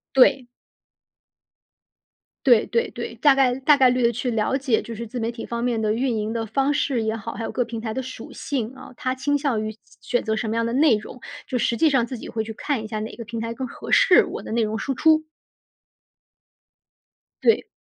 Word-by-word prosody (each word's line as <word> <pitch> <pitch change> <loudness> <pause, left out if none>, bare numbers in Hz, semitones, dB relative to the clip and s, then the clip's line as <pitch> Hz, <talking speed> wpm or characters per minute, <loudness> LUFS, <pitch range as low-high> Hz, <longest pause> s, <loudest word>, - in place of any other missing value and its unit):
对。 265 -1 +5 2.0
对 240 -5 +6
对 230 - 0
对， 235 -1 -6
大 270 +4 +5
概 260 -2 +3
大 290 +3 +5
概 260 -2 +6
率 250 0 +1
地 235 - +4
去 245 +2 -2
了 220 +4 0
解， 260 -5 +1
就 230 - -8
是 235 +2 -5
自 245 +3 -6
媒 230 +1 -1
体 230 - -7
方 235 0 -3
面 235 -2 0
的 215 0 +1
运 245 0 0
营 215 0 -2
的 230 -1 -2
方 270 +6 +1
式 265 -5 0
也 220 0 -1
好， 225 +1 -6
还 230 - -5
有 - - -4
各 245 - 0
平 230 -1 -6
台 220 -2 -4
的 260 - -2
属 255 -3 -9
性 260 -4 -3
啊。 260 - -12
它 255 +1 -2
倾 285 +2 0
向 270 -7 0
于 215 - -3
选 220 - -18 0.4
选 - - -3
择 220 -1 0
什 220 0 -2
么 225 - -1
样 230 - +1
的 230 - -2
内 280 -3 +5
容， 215 +4 -8 0.3
就 255 - -1
实 235 - +1
际 320 - +4
上 265 -5 +2
自 255 -1 -6
己 - - -9
会 220 -2 -2
去 220 - -7
看 260 0 -2
一 215 - -6
下 215 -1 -4
哪 220 - -5
个 230 - -8
平 230 +1 -5
台 230 0 -3
更 260 +1 -5
合 - - -9
适 360 - +6
我 - - -6
的 - - -8
内 230 +1 +1
容 215 0 -2
输 270 - -2
出。 315 +1 +3 2.2
对。 460 - +3
235 Hz, 255 characters per minute, -23 LUFS, 225-265 Hz, 2.2 s, 对